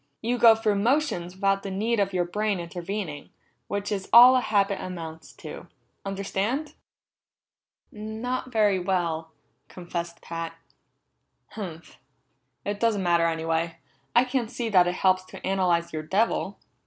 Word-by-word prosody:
You 240 +2 -1
go 230 -1 +8
through 215 -2 0
motions 225 - 0
without 195 0 +1
the 195 - -5
need 215 +4 0
of 195 -1 +1
your 180 -2 0
brain 205 +2 -1
intervening, 175 -2 -5 0.4
which 205 0 -3
is 195 -2 -3
all 245 +2 +10
a 255 - +3
habit 200 -3 +1
amounts 165 -3 -7
to. - - -9 0.4
Understand?" 200 +9 -2 1.2
"Not 225 +4 -4
very 210 -4 +3
well," 170 -3 -1 0.4
confessed 170 -1 -6
Pat. 165 0 -6 0.9
"Humph! 170 -6 -8 0.7
It 205 0 -2
doesn't 220 -4 +1
matter 170 -1 +3
anyway. 165 0 -1 0.4
I 240 - +7
can't 250 -3 -1
see 240 -2 -3
that 180 -4 +5
it 180 - -1
helps 185 0 +2
to - - -10
analyze 175 -3 +1
your 155 - -2
devil." 195 +3 0
195 Hz, 140 wpm, -26 LUFS, 170-220 Hz, 1.2 s, all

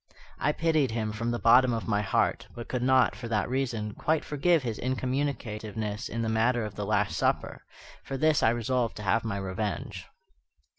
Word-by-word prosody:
I 150 - +2
pitied 155 -3 +1
him 110 -1 -2
from 115 +2 -3
the 120 - -1
bottom 125 +2 +5
of 115 - -3
my 105 -2 +1
heart, 100 - 0
but 120 -1 -7
could 125 - -2
not, 130 0 +3
for 120 - -7
that 110 -2 0
reason, 120 -5 -2
quite 160 0 0
forgive 155 +1 +2
his 115 -4 -3
incommunicativeness 115 -5 -3
in 115 0 -3
the - - -1
matter 115 +1 +1
of 105 - -6
the - - -5
Last - - +1
Supper. - - -1 0.4
For 135 - -4
this 155 +2 +3
I 110 - +5
resolved 120 +1 0
to 105 - -7
have 100 +4 +2
my 110 -3 -2
revenge. 100 +2 -4
115 Hz, 190 wpm, -28 LUFS, 110-130 Hz, 0.4 s, bottom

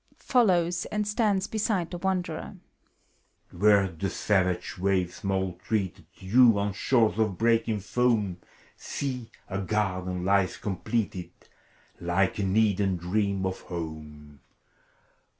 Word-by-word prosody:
(Follows, 180 -8 +2
and 210 -1 -2
stands 210 -3 +1
beside 215 -5 -1
the 175 - -5
Wanderer.) 180 -3 -2 1.0
Where 100 +1 +4
the 90 +2 -4
savage 90 -4 0
waves 95 -2 0
maltreated 95 -1 -2
You, 115 +3 +5
on 100 0 -1
shores 115 0 +2
of 105 -5 +1
breaking 115 -2 +2
foam, 105 -4 +1 0.4
See, 125 -4 -4 0.2
a 100 0 -3
garden 95 -3 -1
lies 100 -1 +2
completed. 100 0 -2 0.7
Like 90 +4 0
an 95 0 0
Eden 100 -3 +2
dream 100 +2 -1
of 95 0 -2
home! 75 -4 -8
100 Hz, 110 wpm, -27 LUFS, 95-120 Hz, 1.0 s, You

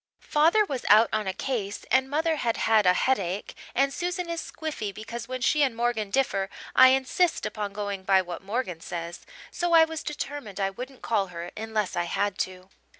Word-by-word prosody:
Father 335 +8 +4
was 270 -8 -4
out 215 +2 +7
on 215 -2 0
a - - +1
case, 205 -2 -3
and 260 +2 +3
mother 315 +2 +1
had 235 -5 0
had 220 -3 +3
a 180 - +7
headache 200 -6 0 0.2
and 275 +2 +2
Susan 355 -1 -3
is 335 - -2
squiffy 300 -10 -5
because 230 +3 -7
when 255 0 -5
she 300 +4 +3
and 265 -5 +2
Morgan 230 -3 -1
differ 195 -6 0 0.3
I 260 - +9
insist 270 +7 +2
upon 205 -2 -3
going 200 -1 -4
by 190 0 +3
what 175 -1 -7
Morgan 195 -4 -3
says, 170 0 -6 0.2
so 350 -1 -1
I 325 -1 +8
was 320 0 -5
determined 285 -8 -5
I 195 0 0
wouldn't 250 +5 -9
call 205 -4 +1
her 175 0 -7
unless 220 -2 -2
I 175 - 0
had 200 +3 -1
to. 185 0 -4
225 Hz, 195 wpm, -26 LUFS, 195-275 Hz, 0.3 s, I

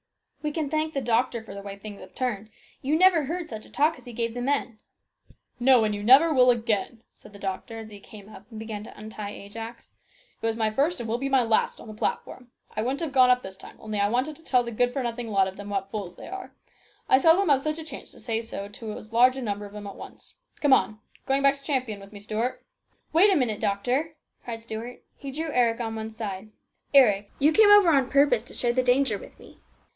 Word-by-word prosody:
" - - -33
We 300 - -1
can 310 -1 -2
thank 310 0 -1
the 275 - 0
doctor 235 -1 0
for - - -10
the 200 - -7
way 200 0 -8
things 205 0 -10
have - - -14
turned. 220 -5 -3 0.3
You 290 +4 +1
never 350 -4 +5
heard 340 +3 -4
such 220 -5 -8
a - - -18
talk 300 0 +1
as 250 - -17
he 245 - -9
gave 230 0 -2
the 245 - -4
men." 255 -4 -1 0.4
" - - -46 0.3
No, 250 -1 +5
and 210 -1 0
you 205 - -4
never 270 +9 +6
will 255 -2 +5
again," 225 -1 0
said - - -17
the - - -11
doctor, 200 +3 -5
as 220 -1 -9
he 205 - -10
came 205 0 -13
up 210 0 -14
and 225 - -10
began 215 -1 -6
to - - -13
untie 215 -1 -7
Ajax. 225 +4 -9 0.5
"It - - -4
was 225 - 0
my 220 -1 0
first 285 +9 +1
and 235 - -4
will 230 +2 -1
be 275 +1 -2
my 265 -2 +4
last 225 -1 +1
on - - -12
the 215 - -8
platform. 245 +3 -4 0.3
I - - -1
wouldn't 260 +6 -2
have 320 -4 -2
gone 255 -2 +5
up 250 0 +3
this 190 0 -8
time - - -13
only 215 -1 -4
I 200 0 +2
wanted 255 +7 -1
to 325 - -20
tell 250 -5 +2
the 235 - -6
good 245 +2 +1
for 265 +1 -2
nothing 235 -1 -4
lot 195 -2 +3
of 190 - -7
them 205 0 -8
what 195 -1 -3
fools 195 -5 -5
they - - -11
are. 385 0 -7 0.6
I 260 - +5
seldom 330 +6 +5
have 275 -2 +4
such 305 +1 -2
a 320 - -6
chance 280 -4 -8
to - - -15
say 225 -1 -2
so 200 -3 -6
to 215 +1 -7
as 215 +1 -12
large 250 +3 +5
a - - -4
number 205 -2 -3
of 200 - -14
'em 210 -1 -7
at 200 - -7
once. - - -12 0.2
Come 290 -3 +5
on. 215 -2 +2 0.3
Going 270 0 +1
back 275 0 +6
to 275 - -20
Champion 255 -8 -1
with 195 0 -13
me, 205 - -10
Stuart? 220 +4 -3
" - - -45
" - - -42
Wait 380 +6 +6
a - - +4
minute, 240 -8 0
doctor! 255 +11 -1
" - - -45
cried 230 -2 -6
Stuart. 230 +2 -7
He 280 - -8
drew 310 +3 -4
Eric 235 -3 +2
on 225 -2 -3
one 220 0 -4
side. 215 -2 -6 0.2
" - - -45
Eric, 210 -7 +5
you 295 +3 +4
came 425 +5 +6
over 410 -4 +7
on 270 -4 +3
purpose 275 -5 +4
to 240 - -8
share 240 -1 +1
the 255 - +2
danger 250 -4 +2
with - - -14
me. - - -16
235 Hz, 265 wpm, -26 LUFS, 215-275 Hz, 0.6 s, over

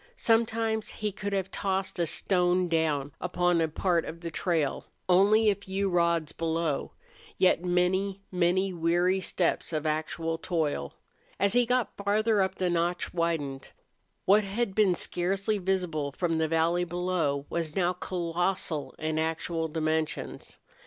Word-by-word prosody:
Sometimes 225 -1 +1
he 210 -1 -3
could 200 +1 -5
have 195 -1 -1
tossed 190 -1 -2
a 170 - +2
stone 180 0 +1
down 155 -4 0
upon 175 -1 +1
a 160 - +2
part 170 +1 +1
of 165 +1 -8
the 170 -1 -5
trail, 160 -4 -1 0.2
only 205 +4 +5
a 210 - +6
few 195 0 -2
rods 170 -3 +2
below, 165 -2 -2 0.4
yet 180 -2 +3
many, 185 +2 +1
many 185 +1 +1
weary 175 +3 +2
steps 180 -1 0
of 155 -1 -2
actual 160 +1 -2
toil. 155 - -2 0.4
As 200 +1 +3
he 245 -1 +3
got 250 -1 0
farther 210 +1 +2
up 190 0 0
the 185 - -1
notch 175 0 -1
widened. 160 -6 -2 0.6
What 205 +3 +5
had 200 +1 -2
been 195 -3 +3
scarcely 195 +5 -1
visible 175 -7 -1
from 165 -3 0
the 160 - +2
valley 165 +2 +2
below 175 -5 -1
was 165 -2 -3
now 180 -1 +2
colossal 175 -2 -2
in 155 0 -1
actual 160 +1 -1
dimensions. 155 0 -2
175 Hz, 145 wpm, -28 LUFS, 165-195 Hz, 0.6 s, a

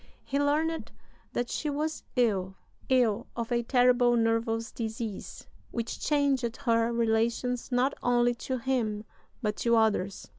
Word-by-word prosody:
He 280 - -1
learned 310 +3 0 0.4
that 240 0 -2
she 300 - -2
was 305 +2 -2
ill 195 -6 +1 0.3
ill 240 -3 +2
of 235 0 -4
"a 240 0 +2
terrible 245 0 +4
nervous 225 0 0
disease, 220 -2 -5 0.2
which 235 -1 -4
changed 275 -5 +1
her 230 0 +2
relations 235 +2 0
not 250 +3 +2
only 245 0 +3 0.2
to 260 - +1
him, 230 -4 -1 0.4
but 210 -1 0
to 235 0 +2
others." 210 -4 +1
235 Hz, 135 wpm, -29 LUFS, 225-255 Hz, 0.4 s, terrible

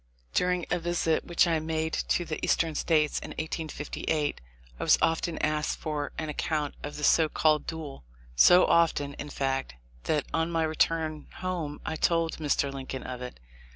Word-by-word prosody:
During 180 -1 +1
a 180 - +2
visit 165 -1 0
which 175 +1 +3
I 165 -2 +1
made 160 0 -2
to 175 - 0
the 155 - -5
Eastern 165 -1 +2
States 150 -1 +1
in - - -8
1858, 155 - -2 0.4
I - - -2
was - - +5
often 165 0 0
asked 155 0 -1
for 150 -2 -3
an 155 - -3
account 150 0 -2
of 145 - -6
the 150 - -6
so 160 +1 +5
called 155 -1 +2
duel; 155 - -6 0.3
so 175 - +7
often, 150 -4 +2
in 145 - -5
fact, 135 - -2 0.3
that 150 -2 +1
on 165 +1 +1
my 165 -1 +1
return 155 -1 0
home 175 -5 -4
I 160 - -3
told 165 0 +1
Mr. 145 -2 0
Lincoln 135 -1 -6
of 125 -1 -6
it. 125 - -7
155 Hz, 170 wpm, -28 LUFS, 145-165 Hz, 0.4 s, so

